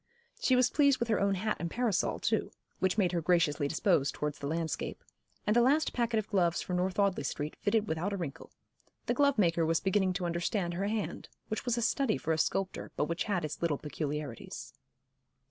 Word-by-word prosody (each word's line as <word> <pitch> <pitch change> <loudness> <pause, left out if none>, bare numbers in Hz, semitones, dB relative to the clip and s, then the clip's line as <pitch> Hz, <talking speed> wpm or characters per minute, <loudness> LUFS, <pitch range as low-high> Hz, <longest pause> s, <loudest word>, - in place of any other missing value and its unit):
She 260 - +3
was 250 -1 +4
pleased 280 -3 +4
with 235 - -1
her 220 - +2
own 200 0 +2
hat 215 +3 -1
and 170 - -2
parasol 225 -2 0
too, - - 0 0.3
which 190 +1 +1
made 185 -5 +3
her 175 -2 0
graciously 155 -4 +2
disposed 160 -2 +1
towards 150 -1 -3
the 140 - -4
landscape; 160 +1 -3 0.4
and 210 - +2
the 240 - +6
last 290 +6 +3
packet 235 -2 0
of 215 - -1
gloves 175 -5 +2
from 180 - -2
North 185 +1 -1
Audley 200 -6 +2
Street 145 +2 -3
fitted 210 +1 +1
without 165 +4 -1
a 200 - -2
wrinkle. 160 -7 -6 0.6
The - - +1
glovemaker 210 - +3
was 160 0 +2
beginning 190 -1 +1
to 180 -1 -2
understand 175 +1 -1
her 195 +3 -1
hand, 215 0 -3 0.2
which 215 - -3
was 245 -1 +1
a 235 - 0
study 245 -1 +1
for 160 - -2
a 160 - -1
sculptor, 190 +4 -1
but - - +1
which 170 +2 -2
had 185 -6 0
its 155 - -6
little 165 -4 +1
peculiarities. 150 -4 -5
185 Hz, 205 wpm, -31 LUFS, 165-215 Hz, 0.6 s, the